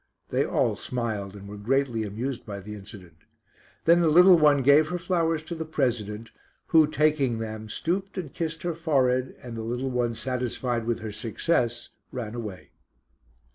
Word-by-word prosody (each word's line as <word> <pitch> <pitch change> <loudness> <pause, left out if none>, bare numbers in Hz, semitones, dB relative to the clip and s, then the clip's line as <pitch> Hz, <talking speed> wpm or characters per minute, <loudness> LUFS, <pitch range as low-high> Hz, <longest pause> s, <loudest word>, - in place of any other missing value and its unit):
They - - +2
all - - +1
smiled, 110 -5 -3
and 100 0 -10
were 105 +1 -8
greatly 125 +1 +1
amused 115 +5 -4
by 100 -2 -6
the 105 +2 -8
incident. 95 -5 -12 0.7
Then 170 +1 +6
the 170 - +3
little 180 +4 +8
one 150 -4 +4
gave 145 +3 +6
her 180 - -2
flowers 165 -3 0
to 165 - -6
the 160 -1 -4
President, 115 -8 -2 0.4
who 160 -2 +6
taking 150 -6 +2
them, 110 -1 -6
stooped 190 - -2
and 165 -7 -5
kissed 160 -1 -4
her 175 -1 -1
forehead, 130 -6 +1
and 120 -2 -7
the 115 - -4
little 125 +4 -2
one 120 -2 0
satisfied 125 -1 -2
with 120 -1 -1
her 110 -1 -5
success 120 +3 -1 0.2
ran 115 -4 -5
away. 105 -6 -7
125 Hz, 170 wpm, -26 LUFS, 110-155 Hz, 0.7 s, little